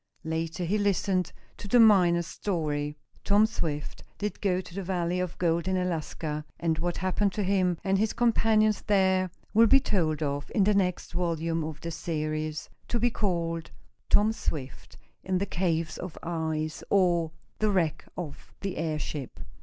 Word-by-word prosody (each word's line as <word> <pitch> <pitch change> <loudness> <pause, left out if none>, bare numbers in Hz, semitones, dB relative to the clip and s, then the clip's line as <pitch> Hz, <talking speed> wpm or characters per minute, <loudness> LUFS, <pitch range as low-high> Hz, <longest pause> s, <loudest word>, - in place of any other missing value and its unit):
Later 160 +1 -2
he 205 +5 +1
listened 195 -3 +1 0.3
to - - -8
the 245 +4 +5
miner's 180 -6 +6
story. 150 -6 -2 0.3
Tom 205 +1 +5
Swift 155 -9 -4
did 210 0 -4
go 185 -3 +2
to 180 - -9
the 195 - -3
valley 180 -1 -1
of 180 -1 -3
gold 170 0 +1
in 190 0 +1
Alaska, 160 -3 -2 0.2
and 165 -2 0
what 175 +1 -1
happened 185 +2 +1
to 210 - -1
him 185 -2 +2
and 195 0 +2
his 220 0 +2
companions 220 -2 +3
there 190 -2 +3 0.2
will 230 +2 +7
be 270 +4 +7
told 160 - 0
of 145 0 -3
in 205 - +5
the 210 +2 +4
next 185 -3 0
volume 165 -2 -1
of 155 0 -6
this 170 -1 -5
series, 155 -1 -3 0.2
to 235 - -1
be 240 +1 +2
called 170 -6 -1 0.4
"Tom 215 +2 +4
Swift 140 -10 -5 0.3
in 185 -1 0
the 195 - 0
Caves 165 -4 -1
of 180 -3 -6
Ice; 160 -2 -2
or, 175 -4 +3 0.3
the 215 - +2
Wreck 170 -6 +1
of 165 -6 -7
the 195 -2 -3
Airship." 155 -4 -3
175 Hz, 165 wpm, -28 LUFS, 160-200 Hz, 0.4 s, will